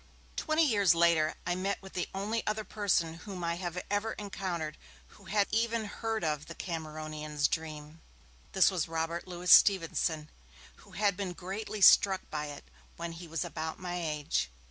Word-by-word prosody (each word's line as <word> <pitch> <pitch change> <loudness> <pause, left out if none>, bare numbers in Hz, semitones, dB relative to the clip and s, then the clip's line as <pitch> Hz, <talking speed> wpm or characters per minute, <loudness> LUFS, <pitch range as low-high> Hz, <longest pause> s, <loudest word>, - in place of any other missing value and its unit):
Twenty 315 +1 +2
years 200 - +4
later 165 -2 +3
I 175 - +1
met 190 +2 -1
with 190 0 -12
the 180 - -2
only 210 +4 -2
other 215 0 0
person 180 -7 0
whom 185 -3 -5
I 170 0 -1
have 175 -1 -3
ever 205 +2 0
encountered 180 -6 -4 0.3
who 200 - -18
had 200 +1 +2
even 230 0 +1
heard 225 0 -3
of 150 -2 -1
'The 170 - -8
Cameronian's 155 -3 -3
Dream'. 155 -1 -5 0.5
This 190 0 +5
was 175 -4 -1
Robert 165 +2 -3
Louis 180 0 -1
Stevenson, 165 -5 +5 0.5
who - - -18
had 200 -2 +2
been 185 -2 -3
greatly 200 +4 -5
struck 190 0 +6
by 150 -1 -2
it 145 -1 -8 0.3
when 170 0 -5
he 170 +1 -9
was 165 -1 -2
about 160 0 -4
my 180 -1 -4
age. 150 - -1
175 Hz, 165 wpm, -31 LUFS, 160-200 Hz, 0.5 s, struck